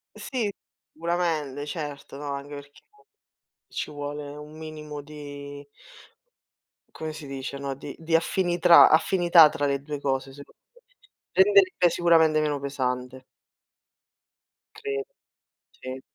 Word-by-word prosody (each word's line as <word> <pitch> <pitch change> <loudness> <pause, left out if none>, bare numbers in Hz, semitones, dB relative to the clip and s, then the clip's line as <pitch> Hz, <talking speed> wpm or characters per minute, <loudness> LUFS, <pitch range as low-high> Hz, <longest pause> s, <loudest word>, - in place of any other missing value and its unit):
Sì, 235 -6 -3 0.4
sicuramente, 160 -4 -2
certo, 145 -3 -6
no, 145 -1 -5
anche 140 +1 -7
perché 145 0 -12 0.9
ci - - -5
vuole 145 0 -6
un 150 +1 -11
minimo 155 -2 -8
di 145 -1 -10 1.3
come 160 0 -5
si 155 -1 -9
dice, 135 0 -6
no, 140 -1 -4
di 140 +1 -9
di 165 0 +2
affinitrà 175 0 +5
affinità 170 -1 +6
tra 150 -1 -2
le 140 -1 0
2 145 0 -6
cose, 135 -1 -2
secondo 140 +1 -15 0.2
me. - - -23 0.6
Renderebbe 385 - +4
sicuramente 160 -3 +4
meno 150 -1 0
pesante. 130 -2 -3 1.5
Credo, 425 -1 -4 0.7
sì 130 +1 -8
150 Hz, 115 wpm, -26 LUFS, 140-165 Hz, 1.5 s, affinità